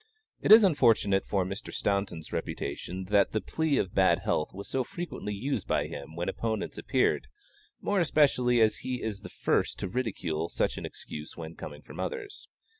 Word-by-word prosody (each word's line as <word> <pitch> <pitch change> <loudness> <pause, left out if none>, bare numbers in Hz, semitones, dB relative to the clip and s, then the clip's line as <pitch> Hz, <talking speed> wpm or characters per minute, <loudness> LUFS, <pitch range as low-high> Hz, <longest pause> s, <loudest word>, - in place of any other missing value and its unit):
It - - +2
is 220 +1 +11
unfortunate 115 - +4
for 95 -3 +1
Mr. 95 +4 -5
Staunton's 100 -5 -1
reputation 90 +6 -4
that 100 -2 +4
the 110 - +2
plea 160 +4 0
of 95 - -1
bad - - +4
health 75 - 0
was 100 +1 -8
so 130 - 0
frequently 170 -7 -5
used 135 +8 -2
by - - +1
him 70 +3 -8
when 85 +1 -3
opponents 110 -2 -2
appeared, - - +1 0.5
more 205 -1 +1
especially 130 -7 +3
as 110 -1 +4
he 125 -1 -4
is 105 -3 -3
the - - -8
first - - 0
to 100 - -3
ridicule 90 -8 -2
such - - 0
an - - -4
excuse 75 0 -9
when 80 -1 -7
coming 75 -2 -9
from - - -11
others. 425 -4 -5
105 Hz, 180 wpm, -29 LUFS, 90-130 Hz, 0.5 s, is